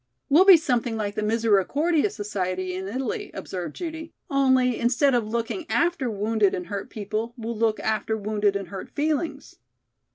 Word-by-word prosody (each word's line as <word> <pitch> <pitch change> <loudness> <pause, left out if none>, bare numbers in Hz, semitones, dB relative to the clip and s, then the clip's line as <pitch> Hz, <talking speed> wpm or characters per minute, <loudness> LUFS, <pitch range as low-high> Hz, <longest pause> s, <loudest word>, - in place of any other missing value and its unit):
"We'll 330 +7 +6
be 385 -3 +10
something 245 -7 -1
like 205 -2 -2
the 215 - -3
Misericordia 230 - +2
Society 185 - -3
in 190 +1 -4
Italy," 250 +3 -3
observed 175 -5 -5
Judy, 320 -2 -6 0.2
"only, 260 -3 +3
instead 250 +4 +3
of 235 -3 +1
looking 235 - -3
after 335 -7 +1
wounded 210 -1 +1
and 180 - -5
hurt 200 +1 -5
people, 215 +3 -4
we'll 230 0 -4
look 220 0 +1
after 220 0 -1
wounded 205 -1 0
and 195 -3 -4
hurt 195 0 -7
feelings." 310 +2 -2
225 Hz, 160 wpm, -25 LUFS, 205-275 Hz, 0.2 s, be